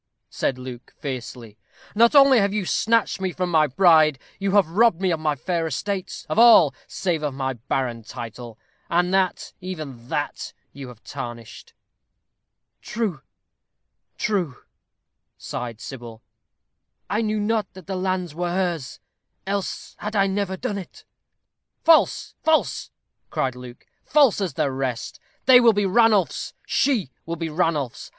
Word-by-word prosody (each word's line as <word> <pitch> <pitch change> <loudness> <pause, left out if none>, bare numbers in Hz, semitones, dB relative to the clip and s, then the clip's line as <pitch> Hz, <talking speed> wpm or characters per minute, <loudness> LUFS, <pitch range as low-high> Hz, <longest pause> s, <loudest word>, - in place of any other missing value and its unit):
said 130 - -1
Luke, 125 -1 -10
fiercely. 120 -6 -7 0.3
"Not 235 +6 +4
only 275 -3 +7
have 200 -1 +2
you 205 -2 -2
snatched 225 +1 +1
from - - -6 0.3
me - - -6
my 155 -1 +5
bride, 155 -1 +5 0.2
you 195 -1 -1
have 200 -5 +5
robbed 195 +1 +3
me 190 -1 +1
of 165 - -1
my 155 -1 0
fair 165 +4 -2
estates, 190 +6 -4
of - - 0
all, 220 - +7
save 175 -5 -2
of 145 -3 -3
my 135 -1 -2
barren 120 0 -3
title, 115 0 -9 0.3
and 175 +2 +1
that, 190 -1 0
even 155 -10 -7
that, 150 -2 -3 0.2
you 140 -2 -8
have 125 -2 -13
tarnished." 120 -2 -8 1.1
"True, 210 -11 -3 1.0
true," 180 -11 -2 0.7
sighed 115 -3 -6
Sybil. 120 -3 -9 0.8
"I 210 - 0
knew 215 -1 -1
not 215 +1 -1
that 190 -1 -12
the 195 - -4
lands 185 -3 -2
were 175 +2 -2
hers, 175 -7 -2 0.5
else 200 0 -3
had 210 +1 -5
I 195 -1 +4
never 195 -1 -2
done 200 +2 -3
it." 185 - -12 0.8
"False, 325 -1 +4
false," 315 0 +1 0.4
cried 130 -2 -1
Luke; 125 -1 -11 0.2
"false 280 -9 +4
as 180 -8 -2
the 140 - 0
rest. 130 -3 -4 0.3
They 255 -1 +8
will 235 -2 +5
be 205 0 +1
Ranulph's. 210 -1 +2
She 230 - +1 0.2
will 165 - -2
be 165 0 -4
Ranulph's. 150 -6 -1
175 Hz, 145 wpm, -23 LUFS, 130-200 Hz, 1.1 s, They